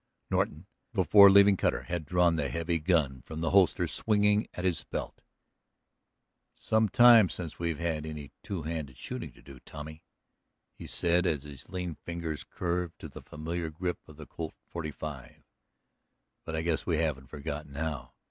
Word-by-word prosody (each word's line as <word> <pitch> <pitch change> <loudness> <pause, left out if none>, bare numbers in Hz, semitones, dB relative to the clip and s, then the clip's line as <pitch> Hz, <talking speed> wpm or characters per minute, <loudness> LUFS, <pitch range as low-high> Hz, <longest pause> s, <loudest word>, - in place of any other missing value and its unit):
Norton, 75 +5 0 0.3
before 100 0 +8
leaving 100 0 +7
Cutter, - - 0
had 85 -4 -4
drawn 90 0 +3
the 70 -4 -1
heavy 85 +5 -1
gun 75 -6 +1
from 80 +5 -7
the 80 - 0
holster 95 -3 +4
swinging 105 -1 +2
at 90 - -4
his 90 -4 +1
belt. - - -6 1.3
"It's - - -22
some 110 -1 +3
time 120 -5 +7
since 85 -4 -5
we've 85 -2 -1
had 80 -1 -2
any 75 -3 -7
two 90 -6 -5
handed 75 -5 -5
shooting - - -6
to - - -19
do, 70 -2 -12
Tommy," 80 +3 -10 0.7
he - - -10
said 90 +1 +2
as 75 -5 0
his 70 -4 -11
lean 90 -2 -4
fingers 85 -3 -4
curved 85 -1 -3
to - - -9
the - - -10
familiar 80 +2 -4
grip 90 +3 -3
of 75 -2 -14
the 75 - -9
Colt 80 +1 -7
45. 75 -4 -7 1.0
"But 80 - -4
I 80 - -1
guess 85 -2 0
we 85 -3 0
haven't 75 -5 -1
forgotten 75 -1 -6
how. 75 -2 -4
80 Hz, 165 wpm, -30 LUFS, 75-90 Hz, 1.3 s, before